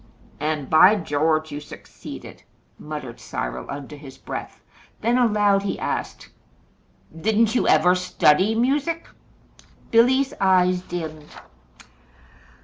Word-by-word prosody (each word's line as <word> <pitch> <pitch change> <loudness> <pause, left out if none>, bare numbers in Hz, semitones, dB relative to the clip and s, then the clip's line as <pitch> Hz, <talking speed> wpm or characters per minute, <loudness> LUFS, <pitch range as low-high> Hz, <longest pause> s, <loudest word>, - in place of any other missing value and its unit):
"And, 150 -2 -2
by 180 +6 +6
George! 155 -2 0
you 145 - -5
succeeded," 150 - -11 0.4
muttered 150 -6 -7
Cyril - - -5
under 140 +1 -7
his 140 -2 -12
breath; - - -7 0.4
then 235 +2 +1
aloud 210 -5 +3
he 200 - -3
asked: - - -4 0.8
"Didn't 220 +5 +1
you 250 - +1
ever 180 - +5
study 185 +2 +2
music?" 285 +8 0 0.8
Billy's 260 +4 +3
eyes 185 -1 +3
dimmed. 155 -4 -7
180 Hz, 105 wpm, -23 LUFS, 150-220 Hz, 0.8 s, by